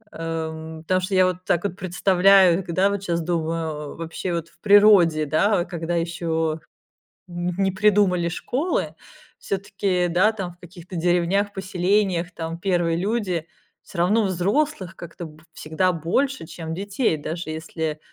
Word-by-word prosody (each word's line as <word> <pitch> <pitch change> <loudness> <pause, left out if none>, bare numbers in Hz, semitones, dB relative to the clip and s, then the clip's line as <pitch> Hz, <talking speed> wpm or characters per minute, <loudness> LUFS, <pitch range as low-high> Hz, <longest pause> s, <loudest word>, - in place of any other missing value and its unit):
Э, 165 -1 -3
м, 160 0 -9
потому 185 +3 +1
что 190 +1 -2
я 185 0 +5
вот 185 0 -2
так 170 - +1
вот 200 -3 -2
представляю, 185 0 +4
г 175 - -6
да 190 +3 +3
вот 200 -1 -3
щас 170 -3 -1
думаю, 160 -3 -3
вообще, 165 +2 -4
вот 165 -1 -3
в - - -29
природе, 200 -7 +5
да, 175 +5 +2
когда 170 -1 -3
еще 165 -2 -1 0.7
нь 175 0 -3
не 190 - +2
придумали 190 -3 +3
школы, 275 - -2 0.4
всё-таки, 195 -2 -1
да, 185 +6 +3
там 190 -5 -6
в - - -26
каких-то 175 +1 -11
деревнях, 175 +4 +1
поселениях, 185 -1 0
там 165 0 -5
первые 175 -3 +1
люди, 190 -4 -1 0.4
всё 180 - -8
равно 205 +6 +3
взрослых 195 - -1
как-то 170 0 -8
б 155 0 -17
всегда 160 +5 0
больше, 180 - -1
чем 160 -1 -6
детей. 200 0 -1
Даже 155 +2 -5
если 160 -1 -4
175 Hz, 150 wpm, -23 LUFS, 165-195 Hz, 0.7 s, я